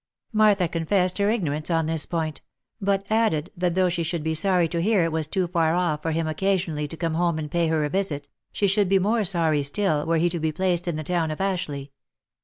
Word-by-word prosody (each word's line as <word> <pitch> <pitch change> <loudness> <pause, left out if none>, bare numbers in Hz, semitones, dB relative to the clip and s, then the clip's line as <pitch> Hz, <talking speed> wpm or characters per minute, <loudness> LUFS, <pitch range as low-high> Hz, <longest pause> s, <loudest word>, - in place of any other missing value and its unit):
Martha 210 -4 +4
confessed 180 +3 0
her 200 +1 +2
ignorance 155 -9 -1
on 165 -2 +1
this 160 -1 -1
point; 160 -3 -3 0.4
but 195 0 0
added, 215 -9 +1
that 175 -1 -1
though 185 -1 +3
she 175 -1 -1
should 165 -1 -2
be 160 0 -1
sorry 180 +1 +2
to 170 +1 -2
hear 200 -1 +3
it 165 - 0
was 160 -1 -1
too 185 +3 0
far 165 -2 +1
off 170 -4 0
for 165 - -2
him 165 +1 -1
occasion 185 +2 0
ally 150 0 -3
to 165 - -9
come 165 -1 -2
home 170 0 +1
and 150 -2 -5
pay 170 -1 +1
her 160 -2 +1
a - - -2
visit, 155 -8 -2 0.2
she 205 - 0
should 200 0 +2
be 195 - +4
more 215 +4 +1
sorry 165 -5 +2
still, 150 +1 0
were 165 0 +2
he 170 +2 +2
to 170 0 -2
be 160 0 0
placed 180 +1 -1
in 170 - -1
the 155 - -4
town 170 0 0
of 155 - -5
Ashleigh. 155 -8 -2
170 Hz, 240 wpm, -24 LUFS, 155-190 Hz, 0.4 s, Martha